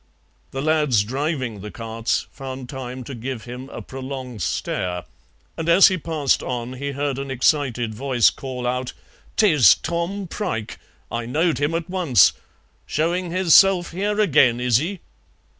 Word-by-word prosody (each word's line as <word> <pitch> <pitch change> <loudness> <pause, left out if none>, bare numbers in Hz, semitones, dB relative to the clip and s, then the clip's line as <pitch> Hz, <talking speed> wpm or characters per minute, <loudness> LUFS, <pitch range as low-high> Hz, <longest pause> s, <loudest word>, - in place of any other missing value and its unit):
The 135 +1 -4
lads 150 -8 +2
driving 130 - -3
the 105 - -7
carts 115 +1 -2
found 130 -2 -7
time 130 -1 -6
to 135 - -8
give 120 0 -5
him 125 +2 -8
a - - -8
prolonged 130 -4 -7
stare, 90 +1 -2 0.5
and 165 +1 -3
as 185 +4 +8
he 185 - -1
passed 155 -4 0
on 125 0 -4
he 140 +2 -4
heard 140 -1 -2
an 140 0 -5
excited 125 -3 +1
voice 125 0 +3
call 130 -2 -6
out, 125 +1 -2 0.4
"'Tis 150 - +6
Tom 175 +4 -3
Prike! 115 - -4 0.3
I 115 0 -3
knowed 160 +6 +1
him 145 +3 0
at 165 0 -2
once; 170 - +4 0.5
showing 175 +3 -1
hisself 185 +1 +5
here 205 +4 -1
agen, 125 - +4
is 125 -2 +3
he?" 175 +7 -3
135 Hz, 150 wpm, -22 LUFS, 125-165 Hz, 0.5 s, as